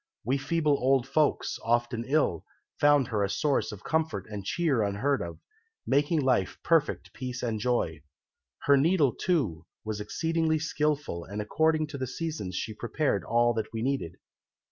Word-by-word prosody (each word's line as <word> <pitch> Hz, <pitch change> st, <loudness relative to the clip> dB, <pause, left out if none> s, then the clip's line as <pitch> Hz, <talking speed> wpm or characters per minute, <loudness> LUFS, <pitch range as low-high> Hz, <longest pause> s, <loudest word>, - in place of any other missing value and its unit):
We 135 Hz, +2 st, +1 dB
feeble 155 Hz, +1 st, +1 dB
old 130 Hz, 0 st, +2 dB
folks, 150 Hz, +2 st, +1 dB
often 120 Hz, 0 st, 0 dB
ill, 135 Hz, -, +1 dB, 0.4 s
found 145 Hz, -3 st, +4 dB
her 105 Hz, -3 st, 0 dB
a 100 Hz, -, 0 dB
source 140 Hz, +6 st, 0 dB
of 105 Hz, -1 st, -10 dB
comfort 160 Hz, 0 st, -1 dB
and 105 Hz, -2 st, -6 dB
cheer 140 Hz, -, +1 dB
unheard 110 Hz, +8 st, 0 dB
of, 85 Hz, -1 st, -6 dB, 0.5 s
making 145 Hz, +3 st, +2 dB
life 125 Hz, -9 st, +1 dB
perfect 165 Hz, -3 st, +1 dB
peace 130 Hz, -1 st, -5 dB
and 115 Hz, -3 st, -1 dB
joy. 115 Hz, -9 st, 0 dB, 0.6 s
Her 140 Hz, -1 st, +5 dB
needle, 150 Hz, -2 st, +3 dB
too, 130 Hz, -, -1 dB, 0.2 s
was 105 Hz, -1 st, -3 dB
exceedingly 160 Hz, +8 st, 0 dB
skilful, 150 Hz, -, -1 dB
and 100 Hz, +2 st, -6 dB
according 155 Hz, +8 st, +1 dB
to 140 Hz, -3 st, -6 dB
the 130 Hz, -, -2 dB
seasons 150 Hz, -, -4 dB
she 110 Hz, -, -3 dB
prepared 120 Hz, -, -1 dB
all 120 Hz, +2 st, +3 dB
that 110 Hz, -1 st, -3 dB
we 115 Hz, 0 st, -3 dB
needed. 135 Hz, -11 st, -1 dB
130 Hz, 160 wpm, -28 LUFS, 110-150 Hz, 0.6 s, Her